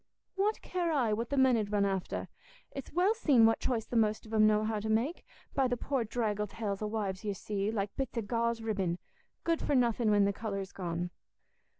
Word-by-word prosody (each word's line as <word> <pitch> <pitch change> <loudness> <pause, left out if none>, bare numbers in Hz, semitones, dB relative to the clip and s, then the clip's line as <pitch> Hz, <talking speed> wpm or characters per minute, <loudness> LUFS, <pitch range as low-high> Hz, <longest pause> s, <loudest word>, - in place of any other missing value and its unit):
"What 410 +3 0
care 350 -2 -1
I 250 -8 +2
what 230 +2 -2
the 280 - -1
men 260 -2 +5
'ud 210 -2 -1
run 205 -1 +2
after? 195 -2 -2 0.4
It's 275 - -7
well 365 +6 +3
seen 285 - +5
what 225 - +4
choice 235 -4 -1
the 245 - -6
most 215 -1 +2
of 220 - -10
'em 215 -1 +6
know 215 0 +3
how 215 -1 -1
to 220 +1 -4
make, 235 +10 0 0.3
by 270 -2 +3
the 245 0 -1
poor 270 0 -1
draggle 210 -2 -1
tails 205 -1 -4
o' 215 - -1
wives 205 -3 -3
you 205 -2 -2
see, 200 +1 -2
like 205 -2 -2
bits 265 -2 -3
o' 230 - 0
gauze 235 +1 0
ribbin, 195 -6 -1 0.5
good 335 -1 +1
for 290 - +1
nothing 235 -2 +3
when 205 -1 +5
the 200 - +1
colour's 195 -2 -4
gone." 175 -1 -3
220 Hz, 220 wpm, -31 LUFS, 205-250 Hz, 0.5 s, em